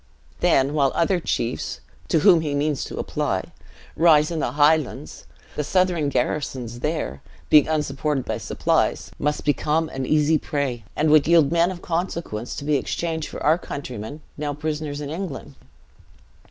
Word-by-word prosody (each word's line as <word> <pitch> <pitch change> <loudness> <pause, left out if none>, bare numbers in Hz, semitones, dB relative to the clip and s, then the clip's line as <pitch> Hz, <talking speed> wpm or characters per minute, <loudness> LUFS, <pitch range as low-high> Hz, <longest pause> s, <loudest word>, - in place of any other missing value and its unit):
Then, 135 +2 +3
while 140 -3 +2
other 175 +2 +2
chiefs 120 -7 -2 0.3
(to 160 - +2
whom 175 -2 +6
he 150 -2 -2
means 145 0 0
to - - -8
apply) - - -2 0.4
rise 155 -1 +5
in 165 - -2
the 125 - -1
Highlands, 145 - +1 0.3
the 150 - -1
Southron 175 -2 +1
garrisons 125 -5 -2
there, 150 - -3 0.3
being 150 -2 +7
unsupported 150 -2 -1
by 110 0 -3
supplies, - - 0
must 150 0 -1
become 155 +2 +1
an 135 -1 -4
easy 155 0 +3
prey, 135 -8 -3
and 155 0 +2
would 155 -1 +5
yield 165 -4 +5
men 170 +1 +3
of 180 -2 -7
consequence, 165 - -3
to 145 - -6
be 150 -1 +2
exchanged 160 +3 -3
for - - -7
our 160 +3 +4
countrymen, 140 -2 -7 0.2
now 145 -1 -3
prisoners 150 -1 -3
in 145 0 -5
England. 165 -4 -6
150 Hz, 155 wpm, -23 LUFS, 140-160 Hz, 0.4 s, being